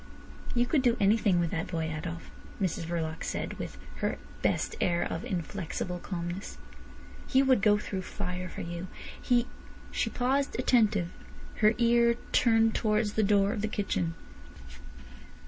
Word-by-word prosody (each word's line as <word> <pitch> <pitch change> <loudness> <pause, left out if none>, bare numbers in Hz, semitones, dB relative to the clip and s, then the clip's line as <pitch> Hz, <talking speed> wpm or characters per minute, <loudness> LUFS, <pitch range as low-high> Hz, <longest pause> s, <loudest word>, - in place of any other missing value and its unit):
"You 240 0 +3
could 270 +2 +2
do 240 -2 +3
anything 200 -2 +4
with 170 -2 0
that 165 - -2
boy, 160 -2 -2
Adolf," 165 +1 -6 0.3
Mrs 180 -4 -1
Verloc 160 -1 -3
said, - - -3
with 65 - -5 0.2
her - - -1 0.2
best - - 0
air 170 -1 +2
of 165 - -3
inflexible 180 0 -3
calmness. 175 +1 -5 0.7
"He 265 +1 +4
would 260 -5 +4
go 210 0 +5
through 195 -2 -4
fire 180 -1 -4
for - - -7
you. 170 +2 -5 0.3
He—" 240 -1 +3 0.5
She - - 0
paused 270 +3 0
attentive, 215 -8 +3 0.5
her 215 +1 +4
ear 235 0 +4 0.2
turned 225 -2 +4
towards 210 -1 +1
the 220 - +2
door 200 -1 +3
of 205 - -3
the 215 - 0
kitchen. 185 -5 -1
200 Hz, 145 wpm, -29 LUFS, 175-230 Hz, 0.7 s, go